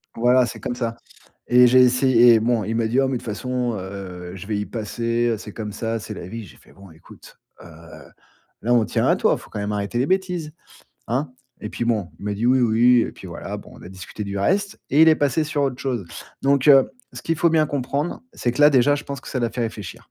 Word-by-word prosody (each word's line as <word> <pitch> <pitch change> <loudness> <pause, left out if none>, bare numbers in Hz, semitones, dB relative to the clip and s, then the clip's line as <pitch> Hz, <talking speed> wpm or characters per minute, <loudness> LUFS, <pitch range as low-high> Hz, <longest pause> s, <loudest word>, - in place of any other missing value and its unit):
Voilà, 125 +2 +4
c'est 110 - -7
comme 120 - -4
ça, 115 -2 -3 0.5
et 125 0 +6
j'ai 130 +1 +5
essayé 125 -1 +5
et 110 - +3
bon 115 -2 +1
il 110 +3 -3
m'a 115 -1 0
dit: 120 +4 0
«Oh 135 - +1
mais 130 -2 -1
de - - -14
toute - - -14
façon, 125 +2 -2
heu, 90 -2 -8
je 95 +1 -9
vais 105 -1 -2
y 105 - -2
passer, 115 +2 -2
heu, - - -1
c'est 105 -1 -10
comme 105 -2 -6
ça, 115 +2 -3
c'est 105 - -8
la - - -8
vie». 115 +2 -7
J'ai - - -16
fait: - - -21
«Bon 100 -2 -16
écoute, 80 - -17 0.2
heu, - - -13 1.0
là 120 - +1
on 120 -2 +4
tient - - 0
à - - +3
toi, - - +2
faut - - -14
quand - - -6
même 105 +1 -3
arrêter 105 +3 -2
les 130 - +1
bêtises, 180 -4 -1 0.6
hein?» 130 +3 -2 0.3
et 105 - -5
puis 120 - -3
bon 110 -6 0
il - - -9
m'a 105 0 -2
dit: 115 +4 -1
«Oui, 130 +1 +4
oui» 120 +1 +4
et - - -6
puis - - -12
voilà, - - -6
bon, - - -12
on - - -14
a - - -10
discuté 95 +3 -8
du 100 -1 -4
reste, 200 - 0
et 150 +3 +5
il 160 - +7
est 160 - +5
passé 145 +2 +1
sur 150 -1 -1
autre 130 -2 -2
chose. 125 -8 -2 0.4
Donc 140 +1 +2
heu, 135 -2 +7 0.2
ce - - -8
qu'il 165 - 0
faut 170 +2 +3
bien 155 -1 +3
comprendre, 145 - -3
c'est 120 - -2
que 125 - -4
là 150 +1 +8
déjà, 140 +2 +4
je 145 - -5
pense 140 -2 -6
que - - -18
ça 130 - -3
l'a 115 - 0
fait 120 - -3
réfléchir! 110 -4 -5
120 Hz, 265 wpm, -22 LUFS, 105-135 Hz, 1.0 s, là